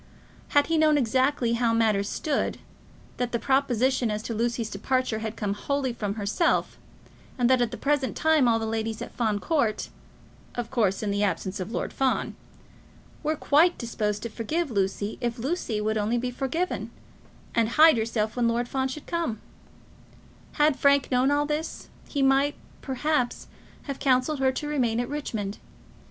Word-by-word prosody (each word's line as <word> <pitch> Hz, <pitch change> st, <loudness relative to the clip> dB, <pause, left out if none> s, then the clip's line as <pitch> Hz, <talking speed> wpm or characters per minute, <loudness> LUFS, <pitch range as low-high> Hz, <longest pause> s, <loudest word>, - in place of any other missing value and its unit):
Had 285 Hz, -, +6 dB
he 325 Hz, -1 st, +1 dB
known 305 Hz, -1 st, +5 dB
exactly 255 Hz, -1 st, +1 dB
how 235 Hz, -1 st, +2 dB
matters 215 Hz, -3 st, +2 dB
stood, 300 Hz, -3 st, -1 dB, 0.6 s
that 245 Hz, -1 st, -1 dB
the -, -, +3 dB
proposition 260 Hz, -1 st, +1 dB
as 210 Hz, 0 st, -3 dB
to 230 Hz, -, -4 dB
Lucy's 230 Hz, 0 st, -1 dB
departure 255 Hz, +2 st, -1 dB
had 220 Hz, 0 st, -4 dB
come 205 Hz, -2 st, -2 dB
wholly 265 Hz, +4 st, -2 dB
from 205 Hz, -3 st, -3 dB
herself, 220 Hz, -, 0 dB, 0.6 s
and 245 Hz, -2 st, +3 dB
that 255 Hz, -1 st, +4 dB
at 240 Hz, -, +2 dB
the 235 Hz, -, -7 dB
present 285 Hz, -2 st, 0 dB
time 315 Hz, -5 st, +4 dB
all 230 Hz, -1 st, +4 dB
the 225 Hz, -, -2 dB
ladies 220 Hz, 0 st, -2 dB
at -, -, -9 dB
Fawn 220 Hz, -4 st, 0 dB
Court, 235 Hz, -3 st, 0 dB, 0.7 s
of 240 Hz, -2 st, -4 dB
course, 215 Hz, -6 st, +1 dB
in 205 Hz, -, 0 dB
the 205 Hz, 0 st, 0 dB
absence 195 Hz, -1 st, -1 dB
of 185 Hz, +4 st, -4 dB
Lord -, -, -3 dB
Fawn, 265 Hz, -1 st, 0 dB, 0.9 s
were 310 Hz, 0 st, 0 dB
quite 315 Hz, +4 st, +3 dB
disposed 210 Hz, -3 st, -2 dB
to 235 Hz, -, -3 dB
forgive 295 Hz, +8 st, -2 dB
Lucy 200 Hz, 0 st, -1 dB
if 240 Hz, 0 st, -1 dB
Lucy 250 Hz, -4 st, -2 dB
would 215 Hz, +1 st, 0 dB
only 215 Hz, +3 st, 0 dB
be 250 Hz, +1 st, -2 dB
forgiven, 280 Hz, +8 st, -2 dB, 0.6 s
and 230 Hz, -1 st, +2 dB
hide 310 Hz, +4 st, +7 dB
herself 220 Hz, -1 st, -1 dB
when 240 Hz, -2 st, +2 dB
Lord 235 Hz, +1 st, 0 dB
Fawn 265 Hz, 0 st, -1 dB
should 270 Hz, +3 st, -7 dB
come; 335 Hz, -11 st, -2 dB, 1.1 s
had 295 Hz, -2 st, +2 dB
Frank 280 Hz, -1 st, +3 dB
known 255 Hz, +1 st, +3 dB
all 290 Hz, 0 st, +2 dB
this, 300 Hz, +2 st, -4 dB, 0.2 s
he 280 Hz, -2 st, 0 dB
might, 270 Hz, +2 st, +3 dB, 0.3 s
perhaps, 265 Hz, -1 st, -1 dB, 0.4 s
have 275 Hz, -2 st, -5 dB
counselled 265 Hz, +2 st, +2 dB
her 265 Hz, -1 st, +3 dB
to 295 Hz, +3 st, -4 dB
remain 245 Hz, -6 st, 0 dB
at 245 Hz, -, -1 dB
Richmond. 220 Hz, -9 st, -4 dB
245 Hz, 170 wpm, -26 LUFS, 220-280 Hz, 1.1 s, hide